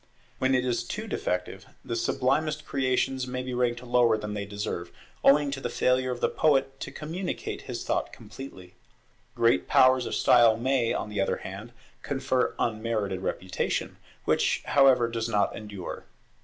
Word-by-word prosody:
When 130 0 +2
it 125 0 +1
is 120 -1 0
too 210 - -5
defective, 90 - -3 0.2
the 115 - -3
sublimest 145 +6 0
creations 130 -1 0
may 125 0 -3
be 125 0 -5
ranked 120 -1 0
lower 120 -2 +3
than 105 -1 -5
they 100 -1 -3
deserve, 100 -4 -4 0.3
owing 145 0 +5
to 135 -1 -4
the - - -2
failure 130 0 +1
of 125 -1 -4
the - - +3
poet 135 -3 +1
to - - -6
communicate 170 +5 -5
his - - -6
thought - - -1
completely. 105 -5 -11 0.6
Great 115 +1 +3
powers 130 -1 +5
of - - -2
style 115 -2 +5
may, 125 -1 +1
on 105 - -2
the 105 -2 -1
other 95 - 0
hand, 100 +5 -7 0.3
confer 130 -2 0
unmerited 110 -4 -1
reputation, 95 -1 -2 0.3
which - - +1
however 135 -4 +5
does 115 0 -3
not 105 -3 +1
endure. 105 -4 -7
125 Hz, 160 wpm, -27 LUFS, 110-135 Hz, 0.6 s, owing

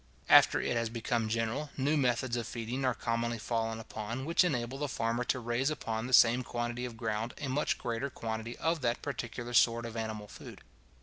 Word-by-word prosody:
After - - +7
it - - -1
has 115 -1 0
become 115 -1 -1
general, 115 +6 -1
new 145 +3 +2
methods 125 -3 +1
of 120 -1 -2
feeding 120 +3 -4
are 125 -2 +2
commonly 115 0 -1
fallen 115 0 -2
upon, 115 +3 -5
which 170 +4 +4
enable 130 -5 -1
the 145 - -1
farmer 115 -1 -1
to 130 - 0
raise 120 +3 0
upon 115 -6 -3
the - - -6
same 120 0 +6
quantity 120 0 -3
of 120 -2 -7
ground 110 0 -2
a 145 - -4
much 140 +3 0
greater 120 +3 -2
quantity 115 -1 -5
of 165 0 0
that 120 -1 0
particular 120 -3 -5
sort 115 0 +4
of 115 -1 -7
animal 110 -2 -4
food. - - -11
120 Hz, 195 wpm, -31 LUFS, 115-130 Hz, -, After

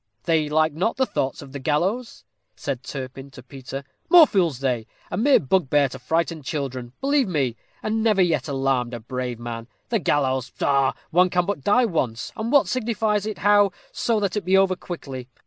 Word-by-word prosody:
"They 160 -3 +1
like 155 0 +2
not 185 +9 -1
the 260 - +3
thoughts 135 - -2
of 135 - -12
the 140 - -6
gallows," 180 - -1 0.3
said 135 -4 -4
Turpin 135 0 -7
to 130 -2 -13
Peter. 135 +1 -8 0.3
"More 345 -2 +9
fools 175 - +1
they. 125 -4 -1 0.2
A - - -2
mere 270 +5 +4
bugbear 145 -3 +2
to - - -9
frighten 160 +4 -1
children, 130 -4 -4
believe 275 -2 +2
me; 140 -9 0 0.3
and 220 +1 0
never 215 -3 +2
yet 160 -6 0
alarmed 135 -3 0
a - - -6
brave 125 +1 -4
man. 115 -1 -6 0.2
The 230 - +1
gallows, 130 -6 0
pshaw! 135 0 +1 0.2
One 180 +2 +4
can 180 0 +1
but 190 -8 -3
die 245 +5 +4
once, 130 - -2
and 225 +2 -3
what 285 - +5
signifies 220 -4 0
it 215 - -4
how, 205 -1 +4 0.2
so 230 -2 0
that 200 -3 -1
it 210 - -1
be 190 +2 +3
over 190 -1 +3
quickly. 135 -8 -7
155 Hz, 190 wpm, -23 LUFS, 130-205 Hz, 0.3 s, More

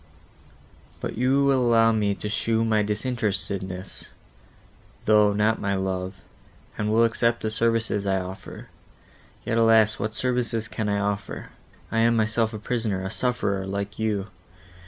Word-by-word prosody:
—"But - - -4
you 130 +4 +2
will 135 -1 +3
allow 115 -2 +4
me 105 -2 +1
to 105 - -5
show 115 +1 0
my 110 -1 +2
disinterestedness, 100 -4 -3 1.0
though 105 -1 +5
not 105 +2 +1
my 100 -1 0
love, 95 0 -2 0.6
and 105 - -2
will 115 +2 +4
accept 115 0 +1
the 110 - -1
services 115 -2 0
I 95 0 +2
offer. 95 +1 -8 0.8
Yet, 115 - +1
alas! 110 -1 +4
what 110 +1 -3
services 120 -2 0
can 110 -2 -3
I 100 - +1
offer? 100 0 -3 0.4
I 115 - +1
am 115 +1 +4
myself 110 0 +1
a 110 - -5
prisoner, 105 -3 -2
a 95 - -4
sufferer, 100 -6 -1
like 100 +1 -4
you. 105 -3 -1
110 Hz, 145 wpm, -25 LUFS, 100-115 Hz, 1.0 s, though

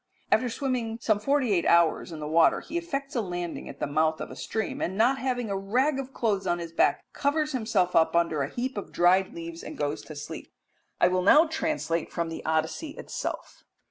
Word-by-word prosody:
After 245 +3 +3
swimming 235 -3 -2
some 215 -2 +1
forty 265 -1 +1
eight 175 -3 +1
hours 170 0 +3
in 160 - -7
the 150 - -4
water 160 +2 +4
he 325 - -9
effects 300 -5 -3
a 235 - +2
landing 175 -3 -5
at 140 - -10
the - - 0
mouth 155 +2 +1
of - - -6
a - - -8
stream, 220 +11 -3
and, 190 +2 -2
not 250 +5 +3
having 245 -4 -2
a - - 0
rag 255 +9 +1
of 270 -1 -5
clothes 210 -6 -1
on 175 - +1
his 170 -1 -6
back, 165 - +2
covers 300 +2 0
himself 215 -8 0
up 165 0 +4
under 165 -3 +2
a 140 - -1
heap 245 +1 -3
of - - -9
dried 185 +2 +3
leaves 165 0 -7
and - - -8
goes 145 0 -2
to 155 - -9
sleep. 145 0 -8 0.5
I - - +6
will 185 0 +1
now 295 - +7
translate 310 - -2
from 170 -1 -2
the 165 - -6
Odyssey 160 - -1
itself. - - -6
195 Hz, 215 wpm, -27 LUFS, 165-260 Hz, 0.5 s, now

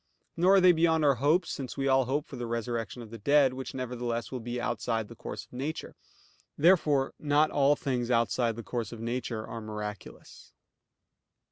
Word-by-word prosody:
Nor 185 +4 +5
are - - +7
they 180 0 +8
beyond 160 -2 +2
our 140 - +5
hopes, 160 +5 +2
since 130 -1 -5
we 135 0 0
all 135 -1 +4
hope 145 +4 -1
for - - -10
the 120 -1 -5
resurrection 115 0 -3
of 110 - -13
the 115 - -8
dead, 140 +3 +4
which 130 0 -6
nevertheless 120 -2 -3
will 130 - -4
be 120 +1 -4
outside 115 -2 -2
the - - -10
course - - -7
of - - -26
nature. 140 +5 -5 0.6
Therefore 150 -5 +3
not 150 +1 +2
all 145 0 +4
things 125 -4 -2
are 125 - +4
outside 115 0 +1
the 115 - -7
course 115 0 -4
of 115 - -8
nature 115 -1 -3
are 115 - -7
miraculous. 105 -1 -8
125 Hz, 195 wpm, -29 LUFS, 115-145 Hz, 0.6 s, they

